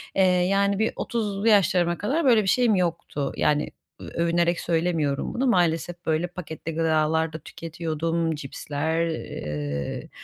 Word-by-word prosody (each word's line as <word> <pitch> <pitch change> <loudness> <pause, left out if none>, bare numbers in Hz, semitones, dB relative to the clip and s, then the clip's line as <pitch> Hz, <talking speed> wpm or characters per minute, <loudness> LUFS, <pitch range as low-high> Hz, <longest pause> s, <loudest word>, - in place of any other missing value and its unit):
Eee, 190 - +4
yani 195 +2 +2
bir 220 - +1
30'lu 210 -2 -2
yaşlarıma 180 -5 +4
kadar 290 +10 0
böyle 230 -5 +5
bir - - -4
şeyim 240 -2 +3
yoktu. 170 -5 -1
Yani, 150 0 +1 0.3
ö - - -9
övünerek 170 +1 +1
söylemiyorum 165 -4 0
bunu 260 +3 0
maalesef, 175 -4 +1
böyle, 160 +2 +1
paketli 165 -2 -7
gıdalar 160 0 +1
da 160 - -5
tüketiyordum, 165 +1 -3
cipsler, 150 +3 -2
eee, 75 - -4
170 Hz, 135 wpm, -25 LUFS, 160-190 Hz, 0.3 s, böyle